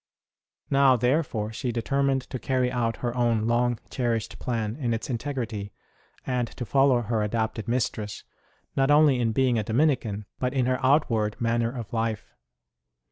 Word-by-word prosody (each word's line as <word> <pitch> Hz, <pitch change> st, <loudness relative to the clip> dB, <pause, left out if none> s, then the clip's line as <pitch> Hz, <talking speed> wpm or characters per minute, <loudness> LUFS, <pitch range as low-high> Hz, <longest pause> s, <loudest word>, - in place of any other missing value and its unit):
Now, 135 Hz, -2 st, +5 dB
therefore, 125 Hz, -4 st, 0 dB
she 125 Hz, +2 st, -2 dB
determined 135 Hz, +3 st, 0 dB
to 130 Hz, -, -3 dB
carry 125 Hz, +1 st, 0 dB
out 115 Hz, -2 st, -1 dB
her 120 Hz, 0 st, -1 dB
own 115 Hz, -3 st, +1 dB
long 120 Hz, +1 st, +2 dB
cherished 115 Hz, -4 st, -2 dB
plan 115 Hz, -3 st, -2 dB
in 120 Hz, -6 st, 0 dB
its 115 Hz, -, -5 dB
integrity, 115 Hz, -5 st, -4 dB, 0.5 s
and 125 Hz, -2 st, 0 dB
to 125 Hz, -, -4 dB
follow 135 Hz, -1 st, +3 dB
her 110 Hz, 0 st, -1 dB
adopted 110 Hz, 0 st, -2 dB
mistress, 110 Hz, -4 st, -2 dB, 0.5 s
not 135 Hz, 0 st, +2 dB
only 145 Hz, -3 st, +5 dB
in 115 Hz, -2 st, +1 dB
being 125 Hz, 0 st, +2 dB
a -, -, -1 dB
Dominican, 115 Hz, -4 st, 0 dB
but 125 Hz, +1 st, -1 dB
in 130 Hz, -2 st, +2 dB
her 130 Hz, +1 st, 0 dB
outward 120 Hz, -7 st, +2 dB
manner 115 Hz, 0 st, +1 dB
of 120 Hz, -5 st, -7 dB
life. 110 Hz, -, -2 dB
120 Hz, 155 wpm, -26 LUFS, 110-130 Hz, 0.5 s, Now